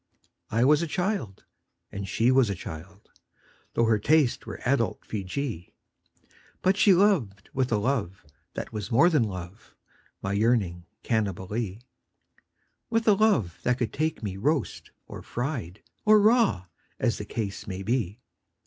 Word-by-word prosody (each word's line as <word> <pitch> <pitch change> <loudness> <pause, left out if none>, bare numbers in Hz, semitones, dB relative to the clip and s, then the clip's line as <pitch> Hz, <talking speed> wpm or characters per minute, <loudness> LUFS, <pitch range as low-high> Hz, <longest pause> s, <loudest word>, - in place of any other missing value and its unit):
I 115 +3 +2
was 150 +3 +5
a 170 - -1
child, 180 - -2 0.5
and 100 -1 -5
she 115 +6 +2
was 130 -4 +4
a 100 - -1
child 90 +4 -10 0.3
— - - -33
Tho' 115 - +3
her 110 -2 +3
tastes 150 0 +2
were - - -6
adult 120 -3 0
Feejee 100 - -4 0.4
— - - -31
But 190 +1 +4
she 205 0 +5
loved 170 - +2
with 130 -2 0
a 110 - +3
love 100 - -2 0.3
that - - -5
was 105 0 -4
more 150 +9 +5
than 150 - +3
love, 95 -1 -6 0.4
My 95 - -3
yearning 100 -5 +1 0.2
Cannibalee; 105 0 -2 1.1
With 225 -1 0
a 210 - +7
love 195 - +2
that 125 0 +1
could 120 -4 -2
take 155 -3 -2
me 95 -2 -4
roast 145 +5 -1 0.2
or - - -9
fried 120 - -4 0.2
Or 215 0 +6
raw, 215 - +3 0.3
as 120 -3 0
the 105 - -5
case 100 -2 -4
might 95 0 -5
be. 115 -2 -1
115 Hz, 155 wpm, -27 LUFS, 100-145 Hz, 1.1 s, a